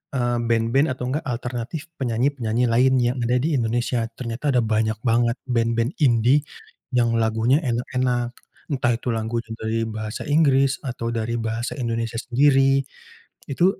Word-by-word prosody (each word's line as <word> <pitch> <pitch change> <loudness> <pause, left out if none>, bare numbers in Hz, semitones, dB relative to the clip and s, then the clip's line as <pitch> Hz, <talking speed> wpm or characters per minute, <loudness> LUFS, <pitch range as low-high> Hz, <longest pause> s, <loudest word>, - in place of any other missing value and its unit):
eee, 120 -1 +1
band-band 115 +6 +2
atau 125 0 -3
enggak 150 +1 -2
alternatif 125 +6 -4
penyanyi-penyanyi 120 -1 0
lain, 130 +3 +4
yang 120 +1 +1
ada 120 +2 +1
di 155 0 0
Indonesia. 120 0 0
Ternyata 125 +4 -2
ada 125 - +4
banyak 110 0 0
banget 120 0 +2
band-band 115 +2 0
indie, 125 +3 +4 0.5
yang 120 -1 +2
lagunya 115 +5 +2
enak-enak. 125 0 -1 0.4
Entah 125 -4 +1
itu 125 - -5
lagunya 115 +1 -3
dari 110 +1 -2
bahasa 110 -1 -5
Inggris, 140 -3 +3
atau 120 -2 -3
dari 115 +1 -2
bahasa 115 +2 -3
Indonesia 115 -1 -2
sendiri, 135 +1 +3 0.7
itu 170 +6 +2
120 Hz, 140 wpm, -23 LUFS, 115-130 Hz, 0.7 s, lain